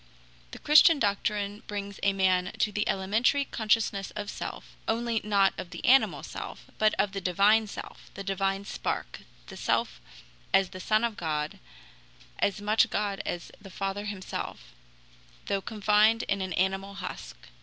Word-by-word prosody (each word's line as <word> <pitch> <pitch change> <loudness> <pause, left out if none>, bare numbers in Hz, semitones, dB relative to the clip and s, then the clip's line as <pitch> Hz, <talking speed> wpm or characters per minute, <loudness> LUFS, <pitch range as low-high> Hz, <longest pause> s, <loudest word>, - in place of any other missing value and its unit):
The - - -9
Christian 305 +2 +6
doctrine 205 -2 -1
brings 200 -1 -5
a 200 - +3
man 185 -2 +1
to 210 - +1
the 210 0 -1
elementary 220 +9 +2
consciousness 215 -4 0
of 205 -1 -4
self, - - -7
only 230 -1 0
not 200 -2 +3
of 175 - -6
the 170 -2 -7
animal 265 +2 +4
self, - - -7
but 215 0 +3
of 195 0 +1
the 195 0 -4
divine 200 +5 +4
self, - - -9
the 195 - -6
divine 195 +1 -1
spark, - - -4 0.3
the - - -10
self - - 0 0.5
as 195 -1 +4
the 185 - -8
Son 215 +4 +2
of 230 -3 -1
God, 150 -2 -2 0.8
as 200 +1 +1
much 210 +2 +3
God 205 -2 -1
as 175 -1 -4
the 195 - -11
Father 195 +2 -3
himself, 200 -3 -6 0.7
though 200 -1 -1
confined 215 +2 +3
in 200 -1 -1
an 185 -1 -3
animal 195 +1 -1
husk. - - -7
200 Hz, 155 wpm, -28 LUFS, 195-215 Hz, 0.8 s, Christian